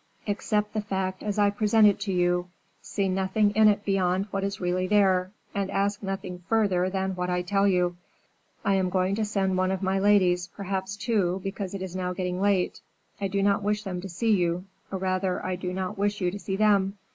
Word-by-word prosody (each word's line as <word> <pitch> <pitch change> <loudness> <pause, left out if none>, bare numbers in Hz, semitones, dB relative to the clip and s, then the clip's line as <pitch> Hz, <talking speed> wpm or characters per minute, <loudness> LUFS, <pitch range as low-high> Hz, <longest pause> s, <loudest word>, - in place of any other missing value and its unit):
Accept 210 0 -1
the 215 - 0
fact 190 -2 -3
as 210 0 -3
I 205 -1 +4
present 215 +1 +3
it 205 -1 +4
to 200 -1 -2
you; 175 0 +1 0.3
see 200 -2 -2
nothing 190 +3 +1
in 215 +1 +5
it 205 0 +2
beyond 190 -1 +1
what 195 0 -2
is 200 0 -3
really 185 +1 0
there, 190 -2 +3 0.2
and 200 -1 -1
ask 200 +1 0
nothing 195 -2 -4
further 195 -5 +2
than 190 0 -1
what 180 0 -2
I 180 0 0
tell 195 +2 +2
you. 180 -2 +1 0.7
I 200 - +3
am 190 -1 +1
going 185 +1 +1
to 220 +2 0
send 195 -3 0
one 185 0 +2
of 190 0 -2
my 190 +1 +1
ladies, 185 -3 +3
perhaps 195 +1 -4
two, 205 -5 0
because 195 0 -4
it 190 - -4
is 185 -1 -6
now 180 -1 -2
getting 180 0 -3
late; 200 -3 +1 0.4
I 200 - +1
do 195 +1 -1
not 200 +1 +3
wish 210 +1 -1
them 185 -3 -4
to 195 - -7
see 220 +6 0
you, 180 -2 +1 0.3
or 195 - -2
rather 185 0 -1
I 185 0 -1
do 180 0 -4
not 185 +1 -4
wish 205 +1 0
you 180 -2 0
to 205 - -6
see 190 -1 -3
them. 200 -1 +2
195 Hz, 215 wpm, -26 LUFS, 185-205 Hz, 0.7 s, in